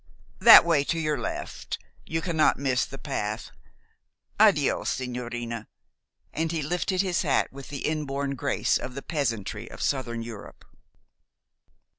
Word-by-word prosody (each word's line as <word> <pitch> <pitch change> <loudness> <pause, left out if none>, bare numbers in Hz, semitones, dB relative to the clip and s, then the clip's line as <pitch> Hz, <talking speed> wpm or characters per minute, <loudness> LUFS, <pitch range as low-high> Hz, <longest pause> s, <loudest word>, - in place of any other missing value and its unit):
"That - - +10
way 160 -4 +3
to 165 - -1
your 155 -2 0
left - - -5 0.3
you 160 0 -1
cannot 160 -3 +2
miss 130 -3 +1
the - - -9
path. - - -4 0.9
Addio, - - +4
sigñorina," 120 -3 -4 0.7
and 160 0 -1
he 160 -3 -2
lifted 180 +4 0
his 185 -2 0
hat 145 -5 +1
with 135 0 -9
the 140 -2 -5
inborn 140 -3 -2
grace 130 - 0
of 130 - -7
the 140 - -6
peasantry 115 - -3
of - - -11
Southern 120 -4 -1
Europe. 115 -3 -10
140 Hz, 135 wpm, -26 LUFS, 120-160 Hz, 0.9 s, That